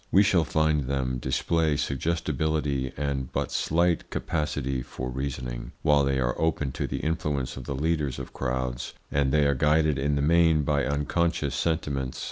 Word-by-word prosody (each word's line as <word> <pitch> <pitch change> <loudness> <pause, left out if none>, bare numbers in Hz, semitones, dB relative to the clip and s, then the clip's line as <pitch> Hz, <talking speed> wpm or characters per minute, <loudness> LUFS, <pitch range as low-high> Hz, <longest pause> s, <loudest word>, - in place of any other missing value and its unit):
We 100 - +6
shall 90 -5 +3
find 80 -1 +1
them 65 -2 -1
display 80 +2 +1
suggestibility 75 -1 -1
and 70 -2 -2
but - - -2
slight 85 +1 +1
capacity 70 -5 -2
for 60 0 -6
reasoning, 65 -2 -4
while 75 -2 +4
they 70 -1 +1
are - - +1
open 75 -4 0
to - - -3
the - - -3
influence 75 -4 -1
of 65 - -8
the 70 - -3
leaders 75 -2 0
of - - -7
crowds, 65 -1 -3 0.2
and 70 -1 +2
they 75 0 +4
are 70 - +3
guided 75 +1 +2
in 70 +2 +1
the 70 - 0
main 80 -1 +4
by 70 -1 +1
unconscious 70 +1 0
sentiments. 70 -4 -1
70 Hz, 165 wpm, -27 LUFS, 65-80 Hz, 0.2 s, We